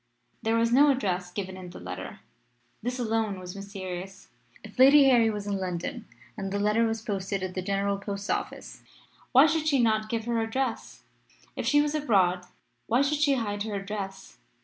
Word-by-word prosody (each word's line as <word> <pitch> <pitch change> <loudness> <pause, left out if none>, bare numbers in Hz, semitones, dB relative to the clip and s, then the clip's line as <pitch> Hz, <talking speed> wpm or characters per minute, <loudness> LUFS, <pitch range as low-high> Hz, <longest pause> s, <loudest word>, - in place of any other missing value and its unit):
There 225 0 +1
was 230 0 +2
no 290 +3 +6
address 185 -9 0
given 190 0 -5
in 185 -1 -9
the 175 - -10
letter. - - -7 0.6
This 245 +3 -3
alone 220 -4 -1
was 180 0 -8
mysterious. 195 -1 -7 0.3
If 220 +2 -12
Lady 275 +2 +8
Harry 240 -4 +5
was 210 -2 -4
in 200 -1 -2
London 190 +7 -4 0.3
and 195 0 -5
the 200 - -1
letter 210 +3 +2
was 225 0 -3
posted 195 -2 -3
at 185 -1 -4
the 185 - -3
General 200 +1 -1
Post 200 0 -5
Office - - -4 0.5
why 265 +3 +8
should 315 0 +1
she 280 -3 +3
not 215 -2 +2
give 225 -1 -2
her 235 -1 0
address? 230 +2 -3 0.5
If - - -3
she 290 0 +5
was 295 0 -1
abroad, 190 -11 +2 0.4
why 245 +5 +3
should 290 +1 0
she 290 -2 +3
hide 205 -4 -3
her 210 -1 -3
address? 195 -1 -6
215 Hz, 185 wpm, -27 LUFS, 195-245 Hz, 0.6 s, Lady